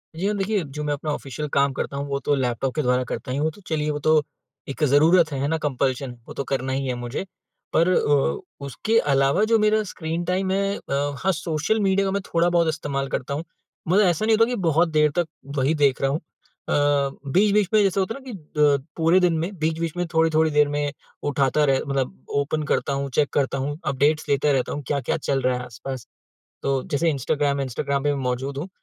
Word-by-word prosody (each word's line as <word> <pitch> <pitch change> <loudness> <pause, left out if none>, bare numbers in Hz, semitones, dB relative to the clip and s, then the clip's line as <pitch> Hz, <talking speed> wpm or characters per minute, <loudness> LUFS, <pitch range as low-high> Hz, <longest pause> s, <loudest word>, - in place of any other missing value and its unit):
जी 175 +4 -3
हाँ, 210 - 0
देखिए, 200 0 0
जो 150 +1 -6
मैं 150 0 0
अपना 150 +1 -3
ऑफिशियल 145 +1 -4
काम 140 0 +3
करता 140 - -4
हूँ, 140 +1 -3
वो 140 0 -2
तो 145 - 0
लैपटॉप 130 -1 -1
के 155 - +1
द्वारा 125 -1 +2
करता 130 - -4
ही 130 - -1
हूँ। 155 +2 +1
तो 205 - -16
चलिए, 155 -2 -1
वो 145 - -3
तो 155 +1 +4 0.5
एक 140 +3 -3
ज़रूरत 155 +4 +5
है, 140 - -3
है 140 - +1
ना, 160 +2 0
कम्पल्शन, 135 -3 -2
वो - - -8
तो - - -3
करना 130 -1 -2
ही 135 0 -1
है 130 - 0
मुझे। 120 +6 -4 0.5
पर 170 +2 +4
अ, 145 - 0
उसके 215 - 0 0.2
अलावा 135 +8 +3
जो 225 - +6
मेरा 215 0 +3
स्क्रीन 165 +1 -3
टाइम 185 +2 0
है 200 +1 0
अ, - - -9
हाँ, 145 +6 0
सोशल 165 +5 -1
मीडिया 195 -1 +2
मैं 200 +1 -1
थोड़ा 170 +1 +2
बहुत 170 -1 +2
इस्तेमाल 145 -3 -2
करता 130 +2 -3
हूँ। 150 +3 -3 0.4
मतलब 190 +5 +4
ऐसा 175 +3 +1
नहीं 220 0 +4
होता 225 - +5
कि 250 - -1
बहुत 165 +2 +3
देर 150 -1 +3
तक 170 - +1 0.3
वही 135 +3 +2
देख 140 -3 +2
रहा 135 - +2
हूँ। 150 - -1
अ, 160 - -10 0.6
बीच-बीच 205 +3 +3
में 215 - +6
जैसे 195 0 +1
होता 195 +4 -1
है - - -8
ना 260 - -7
कि 210 - -7 0.2
अ, 145 -1 +5 0.2
पूरे 165 +2 +4
दिन 175 -3 +2
में 165 +3 -1
बीच-बीच 160 +1 -1
में 175 - 0
थोड़ी-थोड़ी 160 -1 +3
देर 150 0 +4
में 145 0 -1 0.4
उठाता 140 +1 +2
रह 135 -2 +3
मतलब 130 - -3 0.2
ओपन 155 +2 -2
करता 140 - -1
हूँ, 140 0 -2
चेक 145 -1 +3
करता 135 -1 +1
हूँ, 145 +2 -3
अपडेट्स 145 +2 +1
लेते 140 +1 +2
रहता 130 -2 0
हूँ, 145 - -5
क्या-क्या 140 -1 -1
चल 140 -3 -1
रहा 130 0 +1
है 125 - -5
आस-पास। 125 +1 -7 0.6
तो 135 -1 0
जैसे 165 +3 +2
इंस्टाग्राम, 140 0 0
इंस्टाग्राम 140 +1 -2
पे 145 0 +2
मै 140 - -3
मौजूद 130 +2 -2
हूँ। 165 +6 -4
150 Hz, 225 wpm, -23 LUFS, 140-170 Hz, 0.6 s, जो